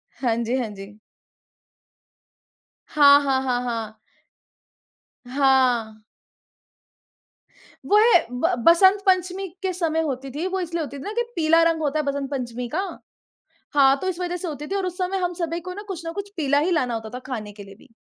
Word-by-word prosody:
हाँ 240 Hz, -3 st, 0 dB
जी, 235 Hz, +3 st, -1 dB
हाँ 240 Hz, -4 st, -2 dB
जी। 200 Hz, +1 st, -11 dB, 1.9 s
हाँ, 285 Hz, -1 st, +6 dB
हाँ, 265 Hz, -1 st, +1 dB
हाँ, 250 Hz, -2 st, 0 dB
हाँ। 225 Hz, -3 st, -4 dB, 1.4 s
हाँ। 250 Hz, -6 st, +2 dB, 1.8 s
वो 415 Hz, -, +4 dB
है 430 Hz, -, +5 dB
ब 290 Hz, +9 st, 0 dB
बसंत 380 Hz, +4 st, +6 dB
पंचमी 370 Hz, +1 st, +1 dB, 0.2 s
के 375 Hz, -, 0 dB
समय 325 Hz, -2 st, 0 dB
होती 270 Hz, -3 st, -4 dB
थी। 300 Hz, +7 st, -4 dB
वो 380 Hz, 0 st, -2 dB
इसलिए 340 Hz, -2 st, -3 dB
होती 280 Hz, 0 st, -7 dB
थी -, -, -9 dB
ना 415 Hz, -, -5 dB
कि 475 Hz, -, 0 dB
पीला 330 Hz, 0 st, +4 dB
रंग 330 Hz, -1 st, +1 dB
होता 305 Hz, 0 st, 0 dB
है 300 Hz, -, -2 dB
बसंत 280 Hz, -1 st, -2 dB
पंचमी 245 Hz, -2 st, -4 dB
का -, -, +1 dB, 1.0 s
हाँ 275 Hz, -1 st, +5 dB
तो 375 Hz, -, -2 dB
इस 355 Hz, -, -3 dB
वजह 355 Hz, 0 st, -2 dB
से 355 Hz, 0 st, -5 dB
होती 300 Hz, -1 st, -6 dB
थी 390 Hz, -, -4 dB
और 385 Hz, -2 st, -1 dB
उस 360 Hz, -, -5 dB
समय 370 Hz, +1 st, -1 dB
हम 355 Hz, -, 0 dB
सभी 335 Hz, 0 st, -3 dB
को 365 Hz, -, -5 dB
कुछ 355 Hz, -3 st, -6 dB
ना 330 Hz, -, -4 dB
कुछ 400 Hz, +2 st, -6 dB
पीला 285 Hz, -2 st, +2 dB
ही 320 Hz, +5 st, +1 dB
लाना 255 Hz, -9 st, 0 dB
होता 220 Hz, -1 st, -5 dB
था -, -, -4 dB
खाने 215 Hz, -6 st, -5 dB
के 205 Hz, -, -11 dB
लिए 195 Hz, -, -13 dB
भी, 225 Hz, -, -21 dB
295 Hz, 185 wpm, -23 LUFS, 250-355 Hz, 1.9 s, हाँ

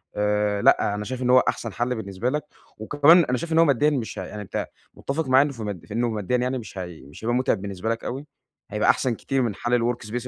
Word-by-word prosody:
آآ 105 Hz, 0 st, +1 dB
لأ 100 Hz, -, +4 dB
أنا 105 Hz, -, -4 dB
شايف 130 Hz, +3 st, -5 dB
إن 125 Hz, -, 0 dB
هو 130 Hz, 0 st, +7 dB
أحسن 115 Hz, -3 st, -4 dB
حل 120 Hz, +3 st, -1 dB
بالنسبة 105 Hz, +1 st, -3 dB
لك، 150 Hz, +3 st, -2 dB, 0.3 s
وكمان 150 Hz, +9 st, +5 dB
أنا 125 Hz, -1 st, 0 dB
شايف 165 Hz, +6 st, -4 dB
إن 160 Hz, -, +4 dB
هو 165 Hz, -, +7 dB
ماديًا 145 Hz, 0 st, +3 dB
مش 130 Hz, -7 st, -3 dB
ه -, -, -4 dB
يعني 105 Hz, -, -7 dB
أنت 100 Hz, -, -4 dB, 0.3 s
متّفق 150 Hz, +3 st, -3 dB
معاك 135 Hz, +3 st, +4 dB
في 125 Hz, -, -12 dB
إنّه -, -, -3 dB
مد 90 Hz, -5 st, -10 dB
في 105 Hz, -, -9 dB
إنّه 120 Hz, +2 st, +1 dB
ماديًا 110 Hz, +2 st, -1 dB
يعني 125 Hz, +1 st, -1 dB
مش 110 Hz, -4 st, -9 dB
هي 90 Hz, -3 st, -7 dB
مش 70 Hz, +9 st, -14 dB
هيبقى 120 Hz, +2 st, +1 dB
متعب 125 Hz, -5 st, +1 dB
بالنسبة 100 Hz, +1 st, -4 dB
لك 115 Hz, 0 st, -2 dB
أوي، 135 Hz, +4 st, -5 dB, 0.5 s
هيبقى 105 Hz, +1 st, +1 dB
أحسن 125 Hz, -3 st, +2 dB
كتير 135 Hz, +4 st, -1 dB
من 115 Hz, -5 st, -1 dB
حال 120 Hz, +1 st, +1 dB
الwork 120 Hz, -1 st, -2 dB
space 125 Hz, +3 st, -4 dB
120 Hz, 255 wpm, -24 LUFS, 105-130 Hz, 0.5 s, هو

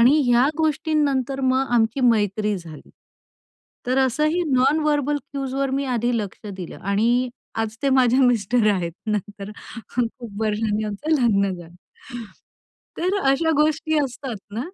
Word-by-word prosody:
आणि 255 Hz, +6 st, +6 dB
ह्या 245 Hz, +1 st, +4 dB
गोष्टींनंतर 290 Hz, -4 st, 0 dB
मग 260 Hz, 0 st, +2 dB
आमची 230 Hz, +3 st, +2 dB
मैत्री 210 Hz, -3 st, +2 dB
झाली. 165 Hz, -4 st, -12 dB, 1.0 s
तर 255 Hz, +2 st, +1 dB
असंही 305 Hz, +7 st, +1 dB
नॉन 265 Hz, +4 st, +3 dB
व्हर्बल 295 Hz, -1 st, +1 dB
क्यूजवर 275 Hz, -1 st, -3 dB
मी 275 Hz, +1 st, -1 dB
आधी 240 Hz, +1 st, 0 dB
लक्ष 210 Hz, 0 st, -6 dB
दिलं 180 Hz, -3 st, -8 dB
आणि 230 Hz, +6 st, +1 dB, 0.3 s
आज 220 Hz, 0 st, -5 dB
ते 280 Hz, -, +2 dB
माझ्या 255 Hz, +1 st, +4 dB
मिस्टर 245 Hz, -2 st, +2 dB
आहेत 175 Hz, -4 st, -2 dB
नंतर 205 Hz, -1 st, -4 dB, 0.4 s
खूप 235 Hz, -2 st, +1 dB, 0.3 s
वर्षांनी 215 Hz, 0 st, 0 dB
आमचं 210 Hz, +9 st, -4 dB
लग्न 200 Hz, -4 st, +2 dB
झालं 175 Hz, -1 st, -12 dB, 1.2 s
तर 365 Hz, +3 st, 0 dB, 0.2 s
अशा 320 Hz, +4 st, +2 dB
गोष्टी 310 Hz, +1 st, +1 dB
असतात 265 Hz, -3 st, -3 dB, 0.2 s
ना, 225 Hz, -, -2 dB
245 Hz, 135 wpm, -22 LUFS, 215-275 Hz, 1.2 s, आणि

